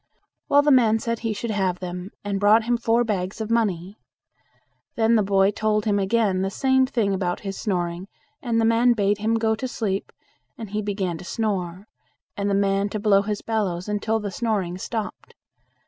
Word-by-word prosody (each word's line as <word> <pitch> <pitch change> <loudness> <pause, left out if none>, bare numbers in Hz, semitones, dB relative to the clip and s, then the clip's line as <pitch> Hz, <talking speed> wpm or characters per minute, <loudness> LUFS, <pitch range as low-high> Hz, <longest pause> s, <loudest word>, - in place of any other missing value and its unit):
Well, 285 0 +5
the 295 - +3
man 230 -4 +5
said 230 0 -3
he 225 -1 -2
should 220 +2 -3
have 190 -3 0
them, 180 +1 -6
and 200 -1 -2
brought 210 +3 +5
him 240 +2 +1
four 235 0 +2
bags 195 -4 -3
of 220 0 -4
money. 200 -4 -1 1.0
Then 225 0 +3
the 220 - +4
boy 195 0 +3
told 215 0 0
him 205 -2 +2
again 195 -1 +1
the 195 - 0
same 265 +4 +2
thing 220 -6 0
about 180 -2 -2
his 195 -1 -5
snoring 175 -2 -2 0.3
and 235 -3 0
the 225 - +3
man 230 +2 +4
bade 205 -2 +1
him 220 +2 +1
go 225 -1 +1
to 220 +4 -3
sleep, 200 -5 -3 0.5
and 220 -4 -8
he 215 0 -1
began 195 -5 -3
to - - -9
snore, 190 -3 -3 0.5
and 200 0 -1
the 200 - +1
man 200 0 +1
to 215 - -4
blow 200 -1 +4
his 205 0 -4
bellows 195 -5 -2
until 215 +2 -1
the 205 -2 -4
snoring 190 -4 -2
stopped. 220 +1 -5
210 Hz, 195 wpm, -23 LUFS, 195-225 Hz, 1.0 s, Well